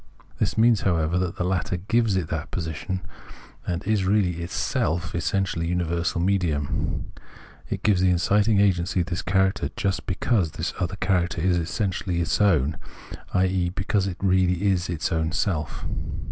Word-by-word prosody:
This - - 0
means, 115 -1 +4
however, 85 -1 +1
that 90 -2 -2
the - - -2
latter 90 0 -1
gives 110 +3 +1
it 90 -4 0
that 80 -2 -3
position, 85 +3 -3 0.7
and 90 -1 -2
is 105 -1 +1
really 95 -2 +2
itselj 85 -1 -1
essentially 85 0 -1
universal 85 0 -1
medium: 85 -6 -1 0.6
it - - -4
gives 100 -4 +3
the 95 - +4
inciting 100 +4 +3
agency 90 -2 +2
this 85 +1 -3
character 95 +2 +1
just 100 -2 -1
because 90 -3 +1
this - - -3
other 90 +2 -1
character 90 -3 0
is 90 +1 +2
essentially 90 0 -2
its 85 +4 0
own, 80 -8 +3 0.6
i.e. 90 -1 +2
because 95 +2 0
it 90 -2 -4
is 95 - 0
really 90 -1 +3 0.4
its 80 - -2
own 80 -1 0
self. 85 -4 -2
90 Hz, 150 wpm, -25 LUFS, 85-95 Hz, 0.7 s, means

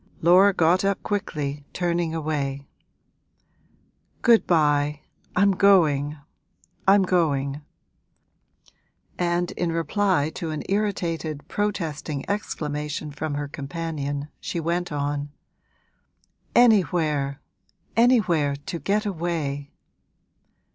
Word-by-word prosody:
Laura 185 +4 +7
got 175 +1 +3
up 195 0 0
quickly, 150 -8 -3
turning 175 -2 0
away. 140 -3 -2 1.6
'Good 230 -2 +5
bye, 150 -3 +2 0.3
I'm 200 +2 +4
going, 155 -7 +3 0.7
I'm 195 0 +6
going!' 145 -6 0 1.6
And 175 0 0
in 175 -2 -2
reply 165 -1 +1
to 165 - -5
an 155 -1 -4
irritated, 165 -7 -2
protesting 160 -9 -3
exclamation 150 -7 -3
from 150 0 -4
her 145 0 -3
companion 145 -1 -4
she 170 - -4
went 170 +2 -1
on, 145 0 -2 1.3
'Anywhere 165 - +3 0.6
anywhere 190 - +3
to 170 +5 -6
get 210 +4 0
away!' 160 -7 -3
160 Hz, 90 wpm, -24 LUFS, 145-185 Hz, 1.6 s, Laura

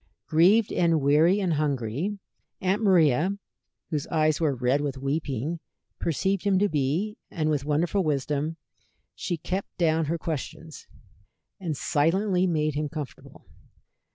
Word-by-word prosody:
Grieved 190 +8 +4
and 165 -2 +3
weary 155 +7 +4
and 185 -4 0
hungry, 145 - -1 0.4
Aunt 190 +3 0
Maria, 180 - +3 0.5
whose 150 -3 -2
eyes 155 -1 +1
were 150 -4 +2
red 125 +3 +1
with 140 -2 -3
weeping, 140 +2 -2 0.4
perceived 190 +4 0
him 200 -2 +2
to 205 +2 +3
be, 160 +7 -1
and 155 -2 -1
with 145 -2 -1
wonderful 165 +6 +1
wisdom 150 +1 -1 0.6
she 175 - -3
kept 185 +5 -4
down 160 -2 +2
her 165 +3 -1
questions, 160 0 -6 0.7
and 165 -6 -3
silently 180 +6 +1
made 155 -3 0
him 150 +1 -2
comfortable. 150 -3 -8
160 Hz, 130 wpm, -26 LUFS, 145-180 Hz, 0.7 s, Grieved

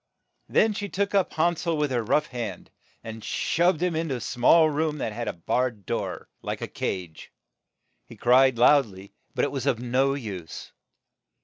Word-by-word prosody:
Then 220 0 +3
she 205 0 -4
took 200 +2 -1
up 195 -3 +2
Han 170 +2 +2
sel 165 -1 -1
with 150 -2 0
her 120 -2 0
rough 150 +7 +2
hand, 115 -9 -6 0.3
and 110 -1 -8
shut 175 0 +1
him 180 0 0
up 160 - -1
in 165 -1 -3
a 130 -3 -2
small 155 +8 +4
room 155 0 -1
that 110 -6 -3
had 120 +2 -4
a - - -2
barred 110 +4 -2
door, - - -4
like - - -4
a - - -3
cage. 90 -4 -5 0.8
He - - -12
cried 130 0 +4
loud 135 +2 +5
ly, 95 0 -13 0.2
but - - +2
it - - -3
was 135 -1 -3
of 130 - +2
no 130 +3 +1
use. 100 - -7
130 Hz, 190 wpm, -26 LUFS, 115-160 Hz, 0.8 s, loud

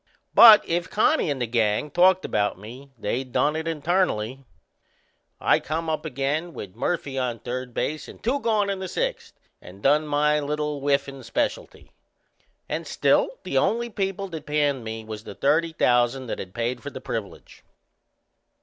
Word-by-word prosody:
But 220 -3 +9
if 170 +1 -1
Connie 265 - +2
and 140 -2 -2
the 125 - 0
gang 115 +4 0
talked 185 +3 +4
about 105 -2 0
me 120 +8 -11
they 120 +4 -2
done 145 +4 0
it 160 +1 -3
internally. 150 - 0 1.0
I - - +3
come 160 +1 -3
up 155 - -3
again 150 +6 -2
with 95 -2 -8
Murphy 140 -6 -2
on 125 -2 -2
third 125 +1 -5
base 155 0 -2
and - - -11
two 260 +5 +1
gone 215 -5 +1
in 195 - -3
the 190 - -4
sixth, - - -3 0.3
and 95 +3 -14
done 150 +2 +3
my 150 +1 +2
little 150 0 -2
whiffin' 140 -1 -1
specialty. 300 - -3 0.8
And - - -4
still - - +2
the - - +1
only 235 +1 0
people 195 -1 -2
that 160 -3 -8
panned 145 -4 +1
me 110 0 -6
was 110 0 -8
the - - -9
thirty 160 +4 +2
thousand 125 -3 +2
that 115 - -5
had 90 -1 -8
paid 120 +1 -2
for - - -6
the - - -8
privilege! - - -7
145 Hz, 165 wpm, -24 LUFS, 125-175 Hz, 1.0 s, But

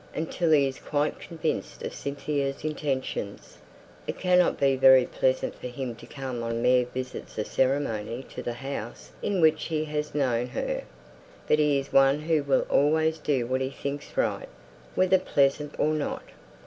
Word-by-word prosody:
Until 165 +2 -1
he's 140 -4 +3
quite 145 0 -1
convinced 165 -2 -4
of - - -4
Cynthia's 140 -1 -3
intentions, 135 -9 -3 0.5
it - - -3
can't 180 -1 +3
be 135 -1 +3
very 130 -1 +7
pleasant 130 +1 0
for - - -8
him 125 0 -5
to - - -13
come 130 -3 -5
on 115 0 -2
mere 125 -1 +4
visits 130 +1 -6
of 105 - -1
ceremony 130 -3 0
to - - -5
the 120 - -3
house 120 -2 -6
in 200 -3 0
which 155 -1 +4
he 155 -1 -1
has 150 -1 -3
known 125 -4 +1
her; - - -3 0.6
but 150 - +3
he's 140 -2 +1
one 135 +2 +5
who 155 -1 +1
will 140 -1 +2
always 160 +2 +2
do 140 -5 0
what 130 +2 -1
he 130 - -1
thinks 140 +1 -6
right, - - 0 0.5
whether 185 0 +4
pleasant 145 -3 +1
or 155 - +2
not." 150 -2 -2
140 Hz, 160 wpm, -27 LUFS, 130-155 Hz, 0.6 s, very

